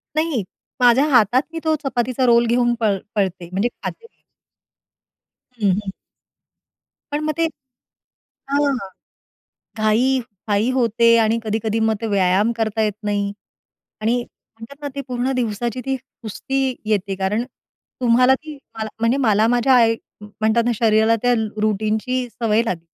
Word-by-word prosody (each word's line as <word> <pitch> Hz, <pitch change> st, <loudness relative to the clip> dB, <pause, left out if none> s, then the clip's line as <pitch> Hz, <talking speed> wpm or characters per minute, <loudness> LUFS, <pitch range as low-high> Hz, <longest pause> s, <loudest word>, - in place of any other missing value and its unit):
नाही, 310 Hz, -8 st, 0 dB, 0.4 s
माझ्या 250 Hz, +3 st, +5 dB
हातात 245 Hz, -1 st, +4 dB
ती 330 Hz, -, -5 dB
तो 315 Hz, -1 st, +2 dB
चपातीचा 255 Hz, -1 st, 0 dB
रोल 235 Hz, -1 st, +5 dB
घेऊन 240 Hz, +1 st, +2 dB
पळ 210 Hz, -4 st, +1 dB, 0.2 s
पळते 185 Hz, -4 st, -1 dB
म्हणजे 200 Hz, +6 st, 0 dB
खाते. 460 Hz, -, -6 dB, 1.6 s
हं, 200 Hz, -, +4 dB
हं. 195 Hz, +1 st, -2 dB, 1.2 s
पण 290 Hz, -, -1 dB
मग 310 Hz, 0 st, 0 dB
ते 330 Hz, -, +2 dB, 1.1 s
हां. 285 Hz, 0 st, +2 dB, 1.0 s
घाई 230 Hz, +5 st, +2 dB, 0.3 s
घाई 210 Hz, +3 st, +1 dB
होते 230 Hz, -1 st, +4 dB
आणि 225 Hz, +2 st, +1 dB
कधी-कधी 220 Hz, 0 st, -1 dB
मग 220 Hz, -, +1 dB
ते 225 Hz, -, -2 dB
व्यायाम 195 Hz, +3 st, +3 dB
करता 220 Hz, -1 st, -1 dB
येत 210 Hz, -1 st, 0 dB
नाही. 205 Hz, -1 st, -1 dB, 0.7 s
आणि 225 Hz, +3 st, +2 dB
म्हणतात 230 Hz, +5 st, -16 dB
ना 290 Hz, -, -3 dB
ते 280 Hz, -, -3 dB
पूर्ण 250 Hz, +1 st, -1 dB
दिवसाची 235 Hz, +1 st, -2 dB
ती 270 Hz, 0 st, 0 dB
सुस्ती 260 Hz, +1 st, -4 dB
येते 200 Hz, -2 st, 0 dB
कारण, 195 Hz, +4 st, -1 dB, 0.6 s
तुम्हाला 250 Hz, +2 st, +5 dB
ती 305 Hz, +1 st, -10 dB, 0.2 s
मला 220 Hz, 0 st, -3 dB
म्हणजे 230 Hz, +3 st, +2 dB
मला 215 Hz, +1 st, +4 dB
माझ्या 245 Hz, +2 st, +3 dB
आई 230 Hz, -2 st, +4 dB, 0.3 s
म्हणतात 220 Hz, +2 st, 0 dB
ना 240 Hz, -, +2 dB
शरीराला 220 Hz, 0 st, +3 dB
त्या 245 Hz, 0 st, +3 dB, 0.3 s
रुटीनची 215 Hz, +4 st, 0 dB
सवय 225 Hz, -1 st, +1 dB
लागली. 170 Hz, -6 st, -3 dB
230 Hz, 140 wpm, -20 LUFS, 215-255 Hz, 1.6 s, माझ्या